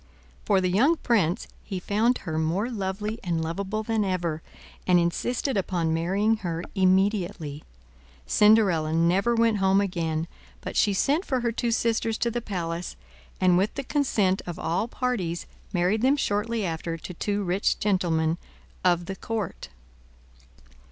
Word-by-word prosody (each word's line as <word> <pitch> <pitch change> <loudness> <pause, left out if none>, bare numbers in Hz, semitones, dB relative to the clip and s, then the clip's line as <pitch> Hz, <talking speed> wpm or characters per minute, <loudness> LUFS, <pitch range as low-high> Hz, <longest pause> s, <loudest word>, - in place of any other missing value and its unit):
For 200 -2 +3
the 185 -1 0
young 265 - +4
prince, 205 - +1 0.2
he 190 -3 -4
found 220 +7 +1
her 160 -3 -1
more 180 +10 0
lovely 210 +1 -3
and 170 -3 -1
lovable 195 +6 -3
than 220 -1 0
ever, 175 -5 -1 0.5
and 180 -1 +5
insisted 235 +10 -1
upon 175 -4 0
marrying 195 +7 +1
her 170 -4 -4
immediately. 185 -6 +1 0.6
Cinderella 195 -8 +4
never 180 +8 +2
went 230 -2 +3
home 195 0 +3
again, 165 -4 -1 0.3
but - - -6
she 205 - +3
sent 285 - +1
for 260 -7 -1
her 235 -1 0
two 235 +1 -1
sisters 225 -1 0
to 235 - 0
the 240 +1 -2
palace, 175 -5 -4 0.4
and 180 -1 +4
with 200 +3 0
the 275 - -3
consent 220 -10 +1
of 175 - -5
all 180 +7 -1
parties 210 -10 -2 0.3
married 185 +3 +1
them 270 +4 +3
shortly 220 -2 -1
after 165 0 -3
to 180 - -8
two 205 +4 -2
rich 185 +2 +1
gentlemen 170 -5 +1 0.4
of 175 -1 +2
the 195 - -5
court. 220 -3 -4
195 Hz, 150 wpm, -26 LUFS, 170-220 Hz, 0.6 s, and